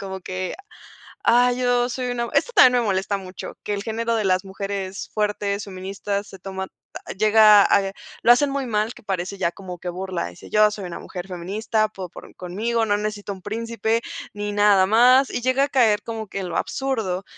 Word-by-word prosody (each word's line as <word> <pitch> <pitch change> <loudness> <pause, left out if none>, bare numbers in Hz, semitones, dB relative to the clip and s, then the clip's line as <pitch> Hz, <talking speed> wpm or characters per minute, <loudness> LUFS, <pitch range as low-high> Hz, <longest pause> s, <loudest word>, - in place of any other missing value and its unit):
como 190 -1 -6
que: 185 0 -4 0.7
"Ay, 245 +1 +4
yo 245 0 +2
soy 250 0 -3
una", 235 -1 -2
esto - - +2
también 250 - +6
me - - -2
molesta 195 +1 0
mucho 185 -1 -8
que 210 - -2
el 200 - -5
género 230 +1 -1
de 220 - 0
las 185 0 +2
mujeres 195 0 -5
fuertes, 205 -1 -1
feministas 200 +1 -4
se 195 - -12
toma 190 0 -5 0.5
llega 215 0 +7
a 200 - +4 0.4
lo 240 - +7
hacen 280 +3 +4
muy 275 -1 -2
mal 220 0 -1
que 245 - -15
parece 190 0 -3
ya 170 - 0
como 180 -1 -9
que 180 - -6
burla 185 - -4
dice 90 - -13
yo 210 0 +4
soy 205 -2 -6
una 175 - -6
mujer 180 0 -8
feminista 205 +4 -1
po 190 -4 -8
por - - -13
conmigo, 225 +6 -1
no 205 - +2
necesito 210 -1 -4
un 190 -2 -13
príncipe 230 +1 -1 0.3
ni 205 0 -4
nada 205 -2 +4
más 250 +5 +5
y - - -3
llega 255 +3 +2
a - - -9
caer 230 -6 +3
como 225 -1 -6
que 195 - -5
en 185 -2 -4
lo - - -2
absurdo 220 -9 -2
205 Hz, 200 wpm, -23 LUFS, 190-230 Hz, 0.7 s, llega